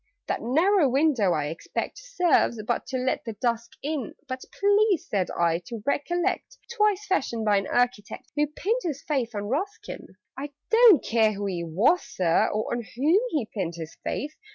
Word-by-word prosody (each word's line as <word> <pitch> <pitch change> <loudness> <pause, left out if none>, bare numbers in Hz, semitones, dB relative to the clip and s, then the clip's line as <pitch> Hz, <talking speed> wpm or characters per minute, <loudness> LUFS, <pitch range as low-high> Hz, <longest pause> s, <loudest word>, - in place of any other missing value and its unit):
"That - - -2
narrow 320 - +3
window, 260 - +3
I 150 -1 -1
expect, 165 - -5
Serves 360 - +1
but 240 - -1
to 260 0 -2
let 255 +1 -1
the 225 - -5
dusk 235 +1 -2
in 290 -5 -3
" - - -39
"But 255 0 -5 0.2
please," 405 -2 +3
said 195 -3 0
I, 170 -1 +1
"to 230 -3 -7
recollect 350 - -1 0.2
'Twas 420 -2 +2
fashioned 250 - -1
by 205 -1 +4
an 195 - -1
architect 245 -4 -1
Who 295 0 +2
pinned 415 - -1
his 295 - -4
faith 250 -6 -1
on 205 - -2
Ruskin!" 370 - -4 0.3
"I 280 +2 -6 0.2
don't 450 - +7
care 220 -2 +3
who 200 0 -4
he 180 -3 -2
was, 195 - +2
Sir, 170 -3 +1
or 215 +2 -2
On 240 - -1
whom 285 - +2
he 290 - -1
pinned 170 -5 -3
his 165 -1 -8
faith! 295 +2 -3
255 Hz, 180 wpm, -26 LUFS, 210-350 Hz, 0.3 s, don't